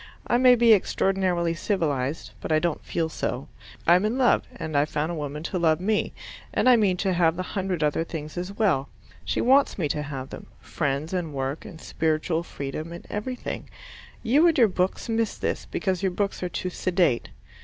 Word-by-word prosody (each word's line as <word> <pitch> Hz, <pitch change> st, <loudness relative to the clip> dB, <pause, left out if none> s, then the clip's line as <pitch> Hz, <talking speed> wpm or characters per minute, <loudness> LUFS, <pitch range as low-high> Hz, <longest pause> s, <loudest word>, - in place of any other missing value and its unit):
I 240 Hz, -, +2 dB
may 250 Hz, -1 st, +7 dB
be 235 Hz, -1 st, +6 dB
extraordinarily 185 Hz, -4 st, +1 dB
civilized, 155 Hz, -, -1 dB
but -, -, -4 dB
I 155 Hz, -, +5 dB
don't 165 Hz, 0 st, -1 dB
feel 165 Hz, -1 st, -1 dB
so; 135 Hz, -4 st, -4 dB, 0.4 s
I'm 175 Hz, +3 st, +5 dB
in 220 Hz, +4 st, 0 dB
love, 255 Hz, -2 st, +3 dB
and 160 Hz, -3 st, -5 dB
I've 145 Hz, +1 st, +3 dB
found 155 Hz, +3 st, -1 dB
a -, -, -3 dB
woman 150 Hz, -1 st, -5 dB
to 180 Hz, +2 st, -2 dB
love 160 Hz, -2 st, +3 dB
me, 210 Hz, +3 st, 0 dB, 0.4 s
and -, -, +1 dB
I 250 Hz, -, +8 dB
mean 200 Hz, -5 st, +2 dB
to 190 Hz, 0 st, 0 dB
have 170 Hz, -2 st, +3 dB
the 185 Hz, -, -3 dB
hundred 185 Hz, -4 st, -2 dB
other 150 Hz, +2 st, +1 dB
things 155 Hz, -2 st, -7 dB
as 180 Hz, +2 st, -4 dB
well. 195 Hz, -10 st, +1 dB, 0.3 s
She -, -, -1 dB
wants 270 Hz, +3 st, +4 dB
me 165 Hz, -6 st, 0 dB
to 150 Hz, -, -1 dB
have 140 Hz, -2 st, -6 dB
them -, -, -9 dB
friends 145 Hz, +2 st, -2 dB
and 165 Hz, -5 st, -2 dB
work, 135 Hz, +2 st, -3 dB
and 175 Hz, -6 st, -10 dB
spiritual 160 Hz, +1 st, -1 dB
freedom, 155 Hz, 0 st, -6 dB
and 170 Hz, -, -9 dB
everything. 245 Hz, +5 st, -4 dB, 0.5 s
You 285 Hz, +9 st, +5 dB
and 325 Hz, -2 st, +3 dB
your 235 Hz, -4 st, +6 dB
books 185 Hz, -1 st, -1 dB
miss 225 Hz, -1 st, 0 dB
this, -, -, -3 dB
because 190 Hz, -3 st, -1 dB
your 190 Hz, -2 st, +1 dB
books 200 Hz, +2 st, -2 dB
are 180 Hz, -, -2 dB
too 180 Hz, +1 st, -3 dB
sedate. 175 Hz, -9 st, +1 dB
175 Hz, 195 wpm, -25 LUFS, 155-200 Hz, 0.5 s, I